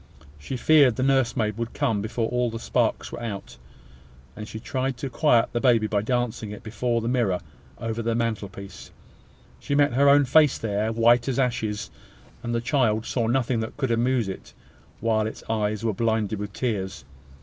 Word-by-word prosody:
She 125 - -5
feared 140 -2 +5
the 130 - -1
nursemaid 120 -5 +1
would 115 0 -4
come 105 -3 0
before 115 +2 -2
all 125 0 0
the 115 - -5
sparks - - -1
were - - -7
out; 105 -4 -6 0.8
and 105 0 -7
she 110 - -7
tried 130 +2 -2
to 135 +1 -5
quiet 125 -7 +3
the 120 - 0
baby 120 -4 +4
by 105 -1 0
dancing 120 -1 -2
it 105 - -9
before 115 +1 -1
the 115 - -3
mirror 115 -8 +1 0.4
over 115 0 -3
the 115 0 -1
mantelpiece. 100 -4 -4 0.7
She 140 - -2
met 145 -3 +3
her 140 +3 +5
own 145 0 +6
face 150 +2 +4
there, 110 0 -1
white 115 +2 +4
as 130 - -1
ashes; 115 -5 -1 0.5
and 120 -1 -3
the 115 - 0
child 115 -4 +1
saw 115 -3 -1
nothing 120 -1 +1
that 110 0 -5
could 135 -4 -1
amuse 120 -1 +1
it, 95 - -8 0.5
while 110 -1 +1
its 110 - -8
eyes 105 -1 -1
were 110 - +1
blinded 110 -1 0
with 105 0 -5
tears. 100 - -3
115 Hz, 180 wpm, -25 LUFS, 110-125 Hz, 0.8 s, own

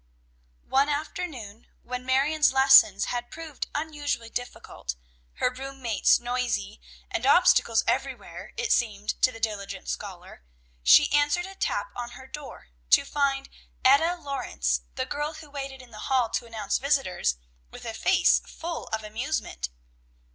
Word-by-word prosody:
One 275 +2 +2
afternoon 285 - -5 0.2
when 250 +1 -6
Marion's 285 +4 +3
lessons 265 -6 +6
had 240 0 -3
proved 320 -3 -6
unusually 290 -6 -3
difficult, 245 - -6 0.4
her 250 - 0
room 270 +1 -8
mates 230 -6 +3
noisy, 245 - -2 0.3
and - - -2
obstacles 225 -1 +5
everywhere, - - -3
it 470 -2 -1
seemed 210 -4 0
to 255 - +5
the 225 - -11
diligent 200 -3 -4
scholar, 185 - -7 0.4
she 290 - +6
answered 290 +4 +2
a 385 - -9
tap 445 - -2
on 240 -1 -6
her 260 - -12
door, 275 - -10 0.2
to - - +6
find 275 -1 0 0.4
Etta 310 +7 +5
Lawrence, 250 - -2
the - - -1
girl 295 +2 -3
who 305 -2 -12
waited 270 -2 -6
in 245 - -17
the 215 - -10
hall 255 -4 +2
to 235 - -2
announce 220 -3 -2
visitors, 265 - +1 0.3
with - - -11
a 225 - -4
face 360 +9 +4
full 335 0 -7
of 220 0 -3
amusement. 215 - -3
260 Hz, 145 wpm, -26 LUFS, 220-290 Hz, 0.4 s, lessons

